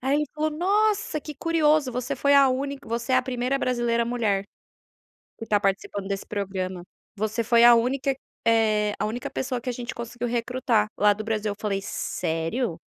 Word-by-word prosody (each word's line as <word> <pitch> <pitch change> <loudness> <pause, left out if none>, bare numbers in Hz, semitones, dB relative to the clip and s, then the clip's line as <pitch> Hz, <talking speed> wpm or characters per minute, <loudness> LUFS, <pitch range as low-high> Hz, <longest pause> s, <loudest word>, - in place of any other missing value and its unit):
Aí, 270 +3 +1
ele 300 - +1
falou: 310 +1 0
"Nossa, 400 +1 +1
que 300 +1 -8
curioso, 310 -2 +2
você 250 +3 -2
foi 280 +1 +3
a 275 -1 +7
única 275 +2 -3
você 235 +2 -2
é - - +6
a - - +3
primeira 255 +1 -1
brasileira 240 -2 +1
mulher 220 -5 0 0.9
que 225 - -7
tá 210 -2 +2
participando 195 0 -2
desse 195 -1 -3
programa. 190 -3 -4 0.3
Você 220 +3 -1
foi 235 +1 +4
a 240 0 +9
única 265 +3 +1 0.3
eh, 215 -2 +3
a - - 0
única 230 +3 -4
pessoa 255 -1 -3
que 250 - -5
a - - -2
gente 240 0 -5
conseguiu 240 +1 -5
recrutar 240 -2 0
lá 205 0 +5
do 215 +2 -6
Brasil". 215 -1 -1
Eu - - -5
falei: 200 -2 -1
"Sério?". 165 +4 -2
240 Hz, 185 wpm, -25 LUFS, 210-270 Hz, 0.9 s, a